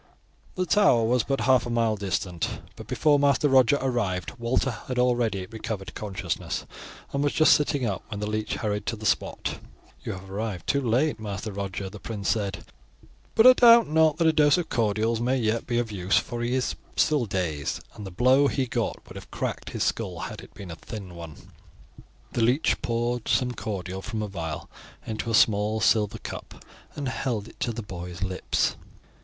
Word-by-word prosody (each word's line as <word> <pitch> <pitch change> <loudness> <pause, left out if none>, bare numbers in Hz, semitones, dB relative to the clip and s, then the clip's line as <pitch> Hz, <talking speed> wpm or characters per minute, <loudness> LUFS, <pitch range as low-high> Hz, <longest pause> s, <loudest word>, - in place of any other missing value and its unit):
The 185 - 0
Tower 180 - +4
was 120 +2 +3
but 135 +3 -1
half 130 -2 +3
a - - -4
mile 115 -2 +1
distant, 90 -3 -2 0.3
but - - -10
before 145 -2 +3
Master 140 +1 +3
Roger 130 0 +5
arrived 105 -10 -1
Walter 120 +3 +1
had 125 +3 -6
already 120 -6 +1
recovered 110 -1 -6
consciousness, 95 -5 -4 0.5
and 140 +1 0
was 145 - +1
just 155 - +6
sitting 145 -3 +1
up 100 -4 -2
when 105 - -6
the 105 - -2
leech 110 0 -2
hurried 105 -2 -2
up - - -26
to 115 - -1
the 110 0 -9
spot. - - -1 0.4
"You - - -3
have 95 0 -9
arrived 100 -4 -4
too 140 - +1
late, 130 +3 +1
Master 105 0 -5
Roger," 100 -1 -4
the 100 +2 -9
prince 105 -3 -4
said; 100 -3 -1 0.7
"but 220 - +6
I 255 - +11
doubt 235 -4 +7
not 160 -1 +4
that 170 - +2
a 160 - +5
dose 150 0 +5
of 175 -2 -2
cordials 110 +1 +1
may 125 +2 +1
yet 115 -1 0
be 120 -1 0
of 120 -2 -1
use, 95 -1 +1
for 120 0 -2
he 120 +2 0
is 130 - 0 0.2
still 145 -7 +2
dazed, 85 -7 -2
and 105 - -9
the 95 - -6
blow 130 +9 +4
he 135 -1 0
got 120 -2 -3
would - - -10
have - - -11
cracked - - -4
his - - -2
skull - - -2
had - - -6
it - - -15
been 100 -4 -8
a - - -6
thin 100 -4 -8
one." 85 -3 -9 1.0
The 120 - -1
leech 125 +7 +2
poured 120 0 -1
some 125 -2 +2
cordial 95 -5 -5
from 110 +1 -4
a - - -3
vial 80 -6 -5 0.4
into 110 +1 -4
a 115 - +2
small 105 0 +3
silver 105 -2 +2
cup - - -9 0.3
and 145 -2 -3
held 120 -5 -2
it - - -16
to 120 - 0
the 115 0 -5
boy's 90 -2 -7
lips. 95 -1 0
115 Hz, 195 wpm, -26 LUFS, 100-130 Hz, 1.0 s, I